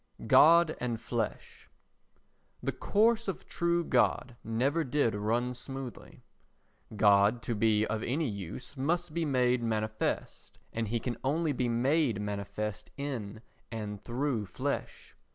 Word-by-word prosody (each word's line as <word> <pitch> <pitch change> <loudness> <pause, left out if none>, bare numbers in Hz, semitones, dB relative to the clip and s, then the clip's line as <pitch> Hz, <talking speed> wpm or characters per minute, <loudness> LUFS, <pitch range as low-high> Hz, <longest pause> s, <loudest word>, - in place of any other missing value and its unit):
God 165 0 +6
and 120 -2 -2
Flesh 115 -4 -4 0.9
The - - 0
course 225 +2 +2
of 195 - -4
true 170 0 +1
God 125 -3 +1
never 135 +9 +1
did 135 -4 +1
run 115 +4 0
smooth. 130 0 -6 1.0
God 105 +2 +4
to 120 - -1
be 110 0 +3
of 110 0 -2
any 145 +6 0
use 100 - -6
must 165 +4 -1
be 170 0 0
made 125 -3 +2
manifest, 110 -1 -2 0.2
and 115 -1 -1
he 115 +3 -1
can 120 0 -3
only 155 +4 +1
be 125 -3 0
made 125 0 +2
manifest 105 +1 -4
in 115 -7 -5 0.3
and 105 -3 -5
through 120 -3 -1
flesh. 90 - -4
120 Hz, 130 wpm, -30 LUFS, 110-145 Hz, 1.0 s, God